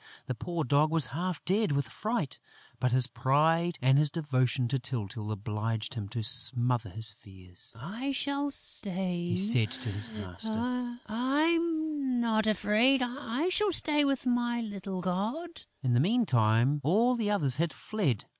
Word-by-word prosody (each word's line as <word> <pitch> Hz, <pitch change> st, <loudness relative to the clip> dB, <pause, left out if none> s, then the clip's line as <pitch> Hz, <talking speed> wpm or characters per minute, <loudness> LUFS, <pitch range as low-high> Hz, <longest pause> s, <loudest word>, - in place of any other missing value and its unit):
The 130 Hz, -, -3 dB
poor 165 Hz, +7 st, -3 dB
Dog 145 Hz, +4 st, +3 dB
was 160 Hz, -3 st, +4 dB
half 175 Hz, +1 st, -3 dB
dead 200 Hz, -3 st, +1 dB
with 140 Hz, 0 st, 0 dB
fright, 215 Hz, -, -3 dB, 0.4 s
but 125 Hz, -, +1 dB
his 130 Hz, 0 st, +5 dB
pride 150 Hz, +8 st, +1 dB
and 135 Hz, +2 st, +5 dB
his 150 Hz, 0 st, +3 dB
devotion 130 Hz, -5 st, 0 dB
to 135 Hz, -, 0 dB
Tyltyl 110 Hz, -4 st, -4 dB
obliged 110 Hz, +3 st, -3 dB
him 105 Hz, -5 st, -5 dB
to 115 Hz, +1 st, -4 dB
smother 125 Hz, -1 st, +1 dB
his 110 Hz, -1 st, +1 dB
fears: 95 Hz, -1 st, -8 dB
"I 220 Hz, -, -4 dB
shall 280 Hz, +1 st, -1 dB
stay," 180 Hz, -8 st, -1 dB
he -, -, 0 dB
said 180 Hz, -, +6 dB
to 120 Hz, -, -5 dB
his 105 Hz, +4 st, -1 dB
master, 225 Hz, -, -3 dB
"I'm 300 Hz, +2 st, 0 dB
not 220 Hz, -2 st, +1 dB
afraid! 220 Hz, +6 st, +3 dB
I 255 Hz, +5 st, -2 dB
shall 410 Hz, +2 st, +2 dB
stay 295 Hz, -3 st, +1 dB
with 275 Hz, -2 st, 0 dB
my 240 Hz, -1 st, 0 dB
little 195 Hz, -4 st, -5 dB
god!" 220 Hz, -, -3 dB, 0.2 s
In 125 Hz, -2 st, +1 dB
the 120 Hz, -, +4 dB
meantime, 135 Hz, -, +2 dB
all 220 Hz, -, +3 dB
the 220 Hz, -3 st, -1 dB
others 145 Hz, -11 st, +2 dB
had 165 Hz, +1 st, 0 dB
fled. 180 Hz, -, -2 dB
175 Hz, 155 wpm, -29 LUFS, -, 0.4 s, said